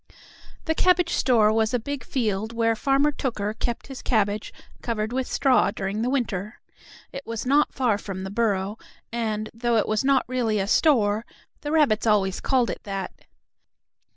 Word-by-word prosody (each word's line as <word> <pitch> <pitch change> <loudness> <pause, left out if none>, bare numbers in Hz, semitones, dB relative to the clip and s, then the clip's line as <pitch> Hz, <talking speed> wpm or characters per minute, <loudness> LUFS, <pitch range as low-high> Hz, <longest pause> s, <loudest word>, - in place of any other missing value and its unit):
The 320 - +1
cabbage 355 0 +2
store 225 -5 +3
was 220 +2 +1
a - - +1
big 280 +2 -5
field 220 -4 -2
where 230 -1 +1
Farmer 275 +4 +2
Tooker 215 -7 -3
kept 235 +1 -3
his 270 -2 -9
cabbage 210 -3 0 0.3
covered 225 -1 -2
with 260 0 -1
straw 265 -6 +3
during 200 +1 -3
the 240 - 0
winter. 215 -6 -2 0.5
It 275 - -7
was 230 0 -4
not 285 +3 +2
far 240 -6 +1
from 190 -2 -6
the 190 - -5
burrow, 205 -2 -1 0.3
and, 215 -2 -2
though 235 0 0
it 215 - +1
was 215 +2 0
not 270 -1 +3
really 240 -4 0
a 195 - 0
store, 220 -3 +3 0.4
the 295 - -4
rabbits 260 -9 +3
always 195 -3 +2
called 255 -4 +1
it - - -7
that. 195 -2 -5
230 Hz, 170 wpm, -24 LUFS, 210-260 Hz, 0.5 s, store